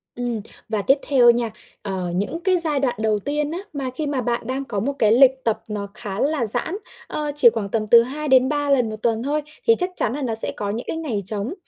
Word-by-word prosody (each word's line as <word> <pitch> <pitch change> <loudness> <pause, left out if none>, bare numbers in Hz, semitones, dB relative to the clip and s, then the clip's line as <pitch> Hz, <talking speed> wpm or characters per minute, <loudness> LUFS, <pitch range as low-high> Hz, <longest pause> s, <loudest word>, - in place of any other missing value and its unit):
Ừm, 240 -2 -3 0.3
và 215 -2 -1
tiếp 270 +7 +3
theo 250 -4 +5
nha, 235 -1 -1 0.3
ờ, 190 -3 -4
những 205 - -2
cái 375 -2 +3
giai 310 -5 +1
đoạn 260 -3 0
đầu 215 -1 +1
tiên 295 +6 -2
á 345 - -4
mà 270 -2 -3
khi 310 - -3
mà 280 -3 -1
bạn 235 0 -2
đang 270 +2 -3
có 210 -5 -3
một 275 +7 -1
cái 215 -2 +4
lịch 260 +2 +5
tập 220 -1 0
nó 205 -1 -4
khá 205 -3 -6
là 285 -4 +1
giãn, 245 - +2 0.3
ờ, 300 -1 -3
chỉ 265 -5 +8
khoảng 220 -3 -4
tầm 215 0 -1
từ 230 +1 +8
2-3 285 +1 +1
lần 250 -5 +3
1 215 - -5
tuần 230 0 0
thôi, 295 +2 -1 0.3
thì 455 - +6
chắc 360 -3 -1
chắn 225 - 0
nà 290 - -4
nó 235 -4 -2
sẽ 220 - +1
có 205 - -3
những 225 +4 -4
cái - - -3
ngày 240 -12 -3
trống, 210 - -3
245 Hz, 245 wpm, -22 LUFS, 220-290 Hz, 0.3 s, chỉ